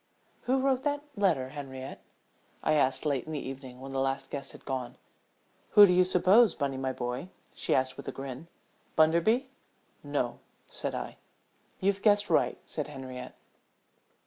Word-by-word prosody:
"Who 260 +2 +2
wrote 265 -1 +2
that 290 0 -1
letter, 170 -11 +1
Henriette?" 135 -2 -7 0.6
I 155 - +3
asked 140 -1 +2
late 140 -4 0
in 160 - -5
the 145 - -4
evening 130 -1 -8
when 135 +1 -8
the 135 - -1
last 135 0 -1
guest 140 -1 -4
had - - -14
gone. 130 -3 -4 0.8
"Who 205 - +12
do 180 - +3
you 180 +1 +6
suppose, 185 +4 +5
Bunny, 140 -2 -1
my 130 0 -1
boy?" 125 +6 -4 0.2
she - - +1
asked 130 0 0
with - - -9
a - - -2
grin. 135 +3 -7 0.5
"Bunderby?" 170 - +3 0.5
"No," - - -2 0.3
said - - -2
I. - - -5 0.6
"You've 200 0 +1
guessed 205 -1 +3
right," - - +3
said 150 - -4
Henriette. 130 -3 -8
145 Hz, 160 wpm, -30 LUFS, 130-195 Hz, 0.8 s, Who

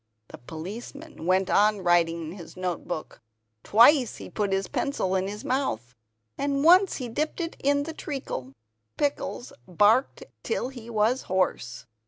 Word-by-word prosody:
The - - -11
policeman 200 - -8
went 185 0 +3
on 210 -1 +3
writing 170 -2 +2
in 160 - -6
his 175 -2 -11
notebook; 180 -2 -4 0.4
twice 245 +3 +5
he - - -10
put 205 -2 -1
his 195 -1 0
pencil 235 -9 -1
in 190 0 0
his 210 +1 -7
mouth, 125 - -2 0.5
and 280 0 0
once 365 +4 +6
he 255 - -4
dipped 305 +10 -3
it 335 -1 -3
in 285 +1 +2
the 320 +2 -6
treacle. 270 - -5 0.5
Pickles 285 -3 -2
barked 215 - +3 0.2
till 450 - -2
he 240 -3 -11
was 230 +3 +1
hoarse. 185 -10 -1
215 Hz, 150 wpm, -26 LUFS, 180-280 Hz, 0.5 s, once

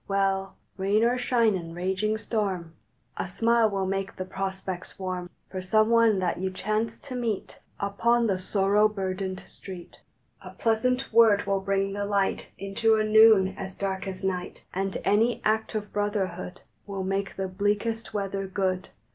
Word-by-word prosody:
Well, 195 -1 0 0.2
rain 200 +3 +2
or 240 +1 +3
shine, 235 -3 +3
in 170 -3 -5
raging 190 +4 0
storm, 195 -7 -2 0.4
A - - -2
smile 230 +4 +3
will 195 -2 -1
make 195 0 -2
the 185 - -4
prospects 190 -1 -5
warm 185 -2 -4 0.2
For 185 - -4
some 215 +4 +3
one 230 -3 +5
that 180 -2 -1
you 190 +1 -1
chance 215 +4 -2
to 275 - -8
meet 230 -5 -3 0.2
Upon 235 +4 +2
the 195 -4 +1
sorrow 200 +2 +3
burdened 190 -2 -3
street. 185 -3 -10 0.4
A - - -11
pleasant 250 +3 0
word 220 -3 +6
will 195 -1 +1
bring 195 0 0
the 205 0 -2
light 200 -1 0
Into 200 +3 +2
a 215 - +2
noon 215 -3 +6
as 190 -1 -6
dark 195 0 -3
as 190 0 -6
night, 180 -2 -3
And 195 +1 -1
any 225 +4 +3
act 220 +1 +1
of 210 -1 -4
brotherhood 190 -3 -2 0.3
Will 195 -1 -3
make 195 +1 -2
the 190 0 -2
bleakest 205 +4 -1
weather 195 -2 -2
good. 185 -1 -1
195 Hz, 165 wpm, -27 LUFS, 190-215 Hz, 0.4 s, word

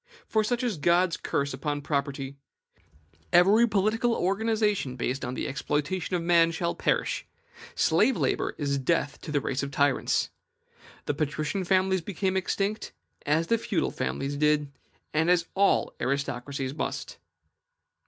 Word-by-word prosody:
For 220 -1 +1
such 245 +3 -1
is 230 -8 -1
God's 170 +3 +3
curse 140 0 -2
upon 145 +2 -3
property; 140 -1 -2 1.0
every 200 +7 +6
political 220 +3 +1
organization 210 - 0
based 130 +2 -2
upon 125 +1 -3
the - - -3
exploitation 150 +6 -2
of 170 - -1
man, 170 -1 +5
shall 170 +1 -1
perish: - - -1 0.5
slave 210 +10 +3
labor - - 0
is 140 -2 -1
death 145 0 0
to 155 - -7
the 145 - +2
race 135 -1 -2
of 140 - -3
tyrants. 140 -1 +1 0.7
The - - 0
patrician 155 +6 -2
families 190 0 +2
became 190 +1 -2
extinct, 200 +3 -1 0.3
as 155 +3 +2
the 230 +5 +1
feudal 205 -5 -1
families 135 +2 -3
did, 150 -1 +2 0.4
and 160 +2 +2
as 175 -2 +3
all 200 +1 +2
aristocracies 140 0 -2
must. 155 - -4
165 Hz, 140 wpm, -27 LUFS, 140-195 Hz, 1.0 s, every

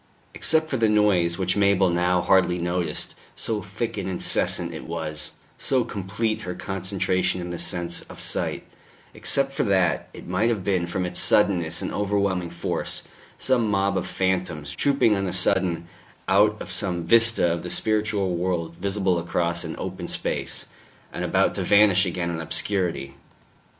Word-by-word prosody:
Except 160 0 +1
for 135 - -2
the 115 -2 +3
noise, 95 -5 +3
which 90 -1 0
Mabel 100 -2 +3
now 90 +1 +2
hardly 90 -1 +3
noticed, 85 -2 -1 0.2
so 110 -2 -1
thick 105 +3 -4
and 95 -1 -3
incessant 90 - 0
it - - -7
was, 80 -2 -3 0.3
so 130 -2 +1
complete 110 +1 -2
her 90 0 -5
concentration 95 0 -1
in 90 0 -5
the 85 - -5
sense 85 -2 -2
of - - -11
sight - - -1 0.5
except 135 0 0
for 135 - -2
that, 95 -4 +1
it - - -11
might 95 +6 +1
have 110 -5 -1
been, 90 -3 0
from 90 +1 -2
its 90 0 -1
suddenness 90 -6 +2
and - - -3
overwhelming 100 -3 0
force, 85 0 -3 0.3
some 120 -4 +2
mob 100 -1 +1
of 95 - -1
phantoms 90 -5 -2
trooping 135 -6 +3
on 95 -1 -1
a 90 - -3
sudden 90 -2 +2 0.4
out 105 +2 +4
of - - -7
some 90 -2 0
vista 115 -2 +4
of 85 - -3
the 90 - -6
spiritual 105 -3 0
world 85 -2 -2
visible 95 -1 0
across 85 0 -1
an - - -5
open - - -5
space, - - -3 0.5
and - - -4
about - - +2
to - - -3
vanish 100 -2 +5
again 85 -1 -2
in 80 -1 -4
obscurity. 85 -5 -1
95 Hz, 165 wpm, -24 LUFS, 85-105 Hz, 0.5 s, vanish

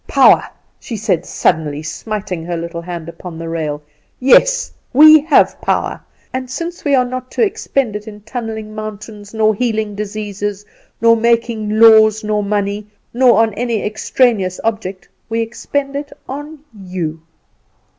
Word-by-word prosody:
"Power!" - - +5 0.3
she 235 -6 -6
said, 190 -5 -1
suddenly, 150 -1 0
smiting 185 +1 -5
her 170 0 -3
little 170 0 -5
hand 170 -2 -7
upon 170 0 -9
the 165 0 -6
rail. 155 -3 -3 0.4
"Yes, - - +4 0.2
we 310 +3 +9
have 310 - +3
power; - - -1 0.3
and 255 0 -4
since 340 +6 -5
we 285 -2 +3
are 255 -1 +3
not 255 0 -6
to - - +2
expend 275 - -1
it 210 +1 -6
in 210 -1 -10
tunnelling 220 -1 -6
mountains, 215 -1 -8
nor 220 -1 +2
healing 220 -2 -1
diseases, 205 -1 -4 0.4
nor 230 0 +6
making 230 -2 0
laws, 220 -1 +6
nor 210 0 0
money, 205 0 -2 0.3
nor 240 -2 +5
on 220 -2 -1
any 230 0 -2
extraneous 215 -3 +1
object, 195 -5 -3 0.2
we 225 0 0
expend 275 +5 -3
it 285 0 -5 0.2
on 290 +4 -7 0.2
you. 180 -5 -5
215 Hz, 145 wpm, -17 LUFS, 195-240 Hz, 0.4 s, we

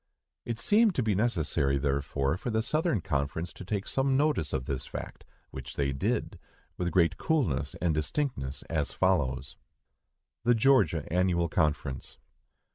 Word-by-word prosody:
It 115 -1 -3
seemed 210 - +4
to 125 - +1
be 110 -2 +1
necessary, 80 - +1
therefore, 70 0 0
for 100 - -4
the 110 -1 +1
Southern 155 - 0
Conference 75 0 -2
to - - -9
take 100 +1 -3
some 135 0 +1
notice 145 - +1
of 65 - -2
this 65 -2 -4
fact, - - -7 0.3
which 65 -1 -8
they 70 -1 0
did, 65 - -1 0.4
with 90 -1 -1
great 85 -2 +3
coolness 135 - 0
and 85 -3 +1
distinctness, 75 - -2
us 80 -3 -1
follows: 70 -7 0 0.9
THE 120 +1 +4
GEORGIA 105 - +3
ANNUAL 90 -1 +2
CONFERENCE. 75 -5 -1
85 Hz, 145 wpm, -29 LUFS, 70-115 Hz, 0.9 s, seemed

